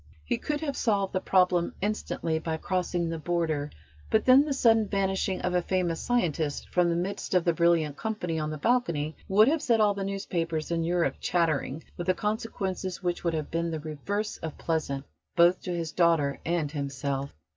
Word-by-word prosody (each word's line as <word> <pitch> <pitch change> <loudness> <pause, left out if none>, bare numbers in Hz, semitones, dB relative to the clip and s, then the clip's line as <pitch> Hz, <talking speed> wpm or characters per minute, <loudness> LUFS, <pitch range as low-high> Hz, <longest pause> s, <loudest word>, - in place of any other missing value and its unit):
He 115 - -1
could 295 0 -2
have 285 -3 -2
solved 200 -6 0
the 185 - +1
problem 180 -2 +2
instantly 190 -5 -1
by 160 0 -3
crossing 180 -1 -1
the 165 0 -3
Border, 160 -3 -1 0.4
but 220 - +2
then 260 +3 +7
the 300 - -3
sudden 225 -5 +4
vanishing 195 -1 0
of 180 - -1
a 180 - +3
famous 175 -2 -1
scientist 165 -11 0
from 175 -1 +2
the 170 - +1
midst 190 +2 -2
of 180 - +3
the 170 - +3
brilliant 165 -3 +2
company 180 -7 -2
on 155 0 -2
the 155 - -4
balcony 160 -7 0
would 210 +3 +5
have 310 +2 +2
set 230 -2 +2
all 210 -1 +4
the 200 0 -4
newspapers 170 -5 -2
in 165 -1 +1
Europe 175 +1 +1
chattering, 160 -3 0
with 180 +1 0
consequences 195 -4 -3
which 175 -1 -1
would 170 -2 0
have 155 -2 -4
been 170 +1 -1
the 160 -1 -3
reverse 180 +8 -3
of 160 -2 -6
pleasant 150 -4 -2 0.3
both 175 +1 +5
to 180 - -4
his 165 -2 -3
daughter 165 -6 +2
and 165 -4 -1
himself. 140 - -3
175 Hz, 190 wpm, -28 LUFS, 160-195 Hz, 0.4 s, then